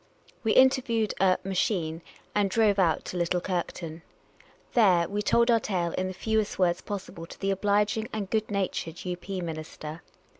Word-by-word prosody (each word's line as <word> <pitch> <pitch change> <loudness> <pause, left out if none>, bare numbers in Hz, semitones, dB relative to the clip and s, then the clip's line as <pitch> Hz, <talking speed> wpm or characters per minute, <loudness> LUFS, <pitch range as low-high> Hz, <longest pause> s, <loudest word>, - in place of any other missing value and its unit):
We 220 - +2
interviewed 250 -5 +3
a 185 -1 +4
"machine" 180 -4 -1 0.3
and 205 -1 +2
drove 210 -1 +3
out 165 -4 +2
to 180 - -5
Little 175 +1 +1
Kirkton. 170 -2 -4 0.7
Tlh.Te, 185 -7 +4
we 205 +1 -1
told 235 +3 +3
our 230 - +5
tale 180 -5 -1
in 185 +2 -2
the 185 - -4
fewest 220 +1 0
words 175 -2 +2
possi 205 -2 -6
ble 165 0 -9
to - - -12
the 195 0 0
obliging 205 +2 +1
and 210 -3 -3
good 215 +2 -1
natured 190 -5 -3
II. 180 -1 -2
P. 190 +1 -5
minister. 155 -1 -6
195 Hz, 175 wpm, -27 LUFS, 175-215 Hz, 0.7 s, our